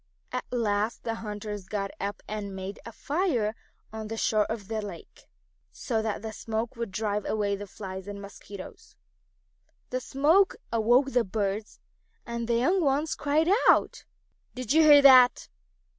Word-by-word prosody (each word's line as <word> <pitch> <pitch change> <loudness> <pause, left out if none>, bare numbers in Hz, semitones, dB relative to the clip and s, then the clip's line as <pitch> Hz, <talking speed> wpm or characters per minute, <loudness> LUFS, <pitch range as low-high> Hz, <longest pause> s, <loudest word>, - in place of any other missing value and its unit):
At 250 - -3
last 215 -2 -1
the 230 - -2
hunters 210 -3 -6
got 195 -1 -3
up 200 +1 -4
and 205 -2 -5
made 190 +2 -6
a - - -7
fire 280 - -1 0.4
on 220 -1 -5
the 225 +1 -5
shore 215 -1 +2
of 220 -3 -5
the 220 0 -2
lake, 195 -5 -10 0.4
so 225 -4 -2
that 220 -1 -3
the 220 -1 -5
smoke 225 +3 -4
would 230 -4 -4
drive 210 0 -2
away 205 -2 -1
the 205 +1 -8
flies 190 -1 -8
and 205 0 -6
mosquitoes. 200 -1 -11 1.0
The 255 0 -2
smoke 315 +10 +3 0.2
awoke 240 +5 +3
the 245 -2 +3
birds, 205 +1 -3 0.5
and 235 -1 -4
the 235 - +1
young 345 +11 +2
ones 290 +2 +1
cried 310 +3 +1 0.2
out. - - +3 0.5
"Did 255 0 -2
you 320 - +6
hear 295 -2 +8
that?" 255 -2 +7
220 Hz, 160 wpm, -27 LUFS, 205-255 Hz, 1.0 s, hear